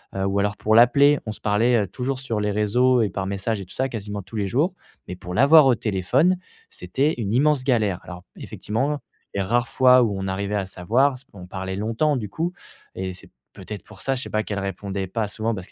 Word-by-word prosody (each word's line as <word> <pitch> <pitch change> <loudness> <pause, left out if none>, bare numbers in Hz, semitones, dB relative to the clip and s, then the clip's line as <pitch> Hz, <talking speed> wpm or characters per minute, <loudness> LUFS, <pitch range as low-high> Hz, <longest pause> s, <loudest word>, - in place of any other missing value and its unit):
heu, 95 - -1
ou 100 +1 0
alors 105 +1 0
pour 110 +1 +1
l'appeler. 140 +5 +6
On 110 - -2
se - - -12
parlait, 115 +4 +2
heu, 100 - -5
toujours 130 +4 -3
sur 120 -5 -3
les 105 0 0
réseaux 120 +5 +2
et 105 - 0
par 95 +1 -4
message 100 +2 -2
et 95 - -8
tout - - -12
ça 130 +1 0
quasiment 105 -3 -5
tous 115 - -12
les 100 - -1
jours, 150 - +1 0.3
mais 90 - -5
pour 90 0 -8
l'avoir 140 +5 +7
au 130 - +4
téléphone, 115 - +1 0.3
c'était 135 - -1
une 100 -1 -2
immense 145 +1 +3
galère. 110 -8 +1
Alors 90 -1 -10
effectivement, 140 +7 -3 0.4
les 100 - 0
rares 120 +5 0
fois 130 -1 +5
où 105 - 0
on 95 - -3
arrivait 100 +2 -2
à 100 -2 -1
s'avoir, 120 +10 +1
c 130 - -14
on 90 -3 -11
parlait 95 0 -5
longtemps 115 +8 0
du 110 -4 -4
coup 165 - -2 0.4
et 95 0 -4
c'est 90 - -14 0.2
peut-être 105 -1 -8
pour 105 -3 -14
ça, 135 0 0
je 130 - -4
sais - - -7
pas 110 0 0
qu'elle 100 -1 -4
répondait 100 0 -4
pas 110 +3 -2
souvent 110 +2 -2
parce 95 -2 -8
que - - -23
110 Hz, 235 wpm, -23 LUFS, 100-130 Hz, 0.4 s, l'avoir